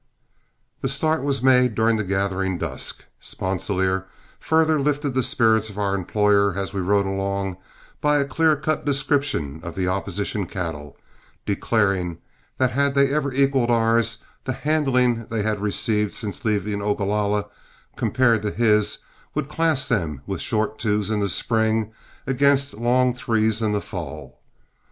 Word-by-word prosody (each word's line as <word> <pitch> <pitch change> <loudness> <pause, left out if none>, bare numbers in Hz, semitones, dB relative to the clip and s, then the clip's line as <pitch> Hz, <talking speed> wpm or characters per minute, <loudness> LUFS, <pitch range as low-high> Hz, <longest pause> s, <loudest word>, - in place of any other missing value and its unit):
The 135 - -1
start 155 +3 +1
was 135 -2 -1
made 125 -3 +4
during 110 +1 +3
the 110 - -1
gathering 95 -1 -1
dusk. 80 -6 -3
Sponsilier 95 0 -1 0.3
further 160 -1 +2
lifted 145 -1 0
the 130 - +2
spirits 110 -2 +2
of 105 - -11
our 100 -1 0
employer, 100 0 +2
as 100 0 -3
we 100 - -1
rode 100 +2 +2
along, 95 -1 -2 0.4
by 150 0 +3
a 140 - +2
clear 155 +3 +2
cut 155 +2 -2
description 140 - 0
of 85 0 -7
the 95 -1 -1
opposition 100 +1 -2
cattle, 80 -6 -5 0.5
declaring 95 -4 0 0.4
that 130 -1 +2
had 140 +3 +1
they 140 0 +3
ever 145 -2 0
equaled 135 -2 +2
ours, 115 0 +2 0.3
the 130 - -1
handling 125 -6 +1
they 110 -2 -2
had 105 -1 -1
received 105 0 0
since 105 -4 -5
leaving 105 -1 -1
Ogalalla, 105 0 0 0.5
compared 120 -4 +2
to 105 - -1
his, 105 -2 +2 0.4
would 135 - -2
class 160 -3 +1
them 80 - -1
with 95 -3 -4
short 110 -1 -1
twos 105 -1 0
in 105 - +1
the 100 -1 0
spring 110 +2 +1 0.3
against 140 +1 +2
long 125 +3 +2
threes 110 -3 +1
in 110 -1 +1
the 105 -1 0
fall. - - -8
110 Hz, 150 wpm, -23 LUFS, 100-130 Hz, 0.5 s, made